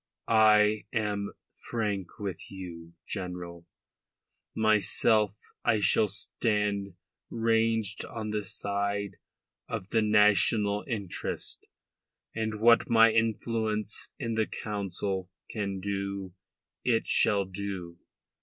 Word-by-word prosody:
I 110 -1 +5
am 105 -3 -1 0.2
frank 105 -6 -4
with 100 -5 -5
you, 85 -3 -9
General. 90 -3 -6 0.9
Myself 110 -1 +3 0.3
I 110 - +3
shall 105 +1 +4
stand 105 -1 -1 0.3
ranged 115 -2 +1
on 110 -2 -5
the 105 -1 -1
side 100 +1 -3 0.5
of 95 - -4
the 115 - +2
national 105 0 +3
interest, 105 -8 -3 0.7
and 110 -1 -3
what 115 +1 +5
my 115 -1 +6
influence 110 -1 0
in 115 -6 -3
the 110 -1 +1
Council 95 -2 -3 0.2
can 100 -3 -3
do 100 -1 -4 0.5
it 115 -2 +2
shall 100 -3 +3
do. 95 -3 -6
105 Hz, 100 wpm, -29 LUFS, 100-110 Hz, 0.9 s, my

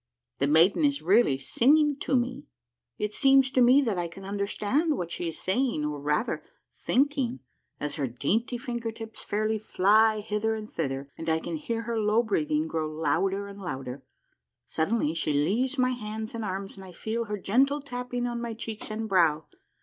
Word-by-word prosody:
The 140 - +2
maiden 165 - +4
is 285 -1 +1
really 190 - +4
singing 285 - +3
to 275 - 0
me 255 +4 -3 0.5
I - - -3
It 210 0 -1
seems 270 0 +4
to 255 - +3
me 255 +4 +6
that 215 -8 -1
I 175 - -1
can 190 +3 -11
understand 205 - 0
what 170 -1 -4
she 175 0 -3
is 160 - -4
saying, 210 - 0
or, 150 -1 -3
rather, 150 - -1 0.3
thinking, 270 - 0 0.4
as 150 +2 -3
her 140 -3 0
dainty 205 - -1
finger 235 -1 -4
tips 225 0 -8
fairly 215 +1 -1
fly 215 +2 +3
hither 215 +1 -1
and 215 -1 -6
thither, 140 -6 -4
and 165 0 -3
I 160 - +3
can 165 +1 -4
hear 230 +9 -3
her 230 0 -2
low 215 +2 +3
breathing 155 -7 0
grow 160 -1 -2
louder 195 +5 0
and 200 0 -10
louder. 135 -6 -5 0.6
Suddenly 160 -1 0
she 160 -2 -1
leaves 220 - +1
my 255 0 +3
hands 220 -2 -5
and 230 -1 -4
arms 195 0 -4
and 195 - -10
I 185 -1 -11
feel 225 +6 -3
her 210 -1 -3
gentle 270 +9 +2
tapping 250 -3 -4
on 240 -1 -3
my 235 -1 -4
cheeks 220 -1 -6
and 220 +1 -3
brow. 165 -6 +3
210 Hz, 190 wpm, -27 LUFS, 165-240 Hz, 0.6 s, me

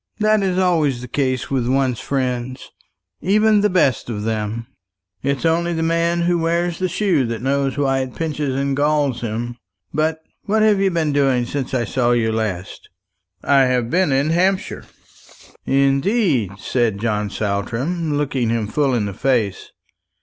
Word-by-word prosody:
That 215 -1 +3
is 185 -2 0
always 160 -9 +1
the 125 - -7
case 130 0 -1
with 130 -3 0
one's 130 -2 +1
friends 130 -2 -3 0.5
even 210 +2 +3
the 210 - +3
best 150 - +1
of 105 -3 -4
them. 110 +1 -2 0.6
It's 140 +2 -1
only 170 +1 +1
the 165 -1 -1
man 170 +1 +1
who 175 0 +1
wears 170 +1 0
the 185 -1 0
shoe 175 -5 +1
that 115 0 -4
knows 135 0 0
why 135 -2 +1
it 130 -2 -4
pinches 150 -4 -2
and 140 0 0
galls 145 -3 +1
him. 120 +1 -4 0.4
But 160 +1 0 0.2
what 215 +1 +2
have 210 -2 +4
you 195 0 +3
been 160 -4 0
doing 135 -4 +2
since 135 +1 -3
I 120 -2 0
saw 120 +1 +1
you 115 -2 +1
last?" 105 -5 -4 0.5
"I 135 -1 +4
have 125 -2 0
been 180 -3 +2
in 140 +4 +1
Hampshire." 185 +3 0 0.8
"Indeed!" 140 - +2
said 115 0 0
John 105 -2 -1
Saltram, 120 - -2
looking 135 -5 -1
him 115 -1 0
full 135 +4 0
in 110 -3 0
the 100 - -4
face. 115 -4 -1
135 Hz, 165 wpm, -20 LUFS, 120-165 Hz, 0.8 s, have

